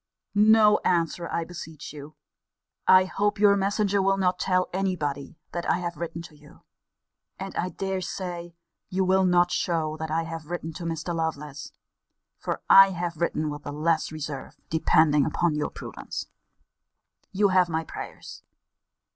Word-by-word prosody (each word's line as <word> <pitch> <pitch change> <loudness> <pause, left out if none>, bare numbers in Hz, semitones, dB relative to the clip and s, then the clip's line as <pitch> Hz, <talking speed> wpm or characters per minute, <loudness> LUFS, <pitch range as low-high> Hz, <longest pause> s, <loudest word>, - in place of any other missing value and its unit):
No 210 0 +6
answer, 170 -1 0
I 170 - -1
beseech 160 -3 -9
you. 150 +1 -10 0.7
I 185 0 +7
hope 205 +3 0
your 200 0 +5
messenger 200 0 +1
will 195 0 +2
not 180 -1 +1
tell 185 -1 +1
any 190 0 0
body 145 -1 -4
that 175 -1 -3
I - - +3
have 175 -1 -4
written 170 0 -5
to 160 - -13
you. 150 0 -19 0.7
And 195 0 -7
I 180 - -1
dare 190 0 -3
say 175 -2 -5 0.3
you 190 +1 0
will 190 +1 +3
not 175 -1 +3
show 160 -3 -1
what 160 0 -4
I 165 +1 0
have 165 -2 -7
written 165 -1 -5
to 170 +2 -7
Mr. 165 +1 -3
Lovelace 150 -4 -4 0.7
for - - -4
I 195 0 +9
have 175 -2 -4
written 155 -2 -1
with 145 0 -7
the 145 - -6
less 155 +2 0
reserve, 150 -3 -6 0.2
depending 155 -2 +4
upon 160 +3 0
your 150 0 -1
prudence. - - -7 1.1
You 200 +1 +3
have 185 -2 +3
my 160 -1 -1
prayers. - - -9
170 Hz, 160 wpm, -26 LUFS, 155-185 Hz, 1.1 s, I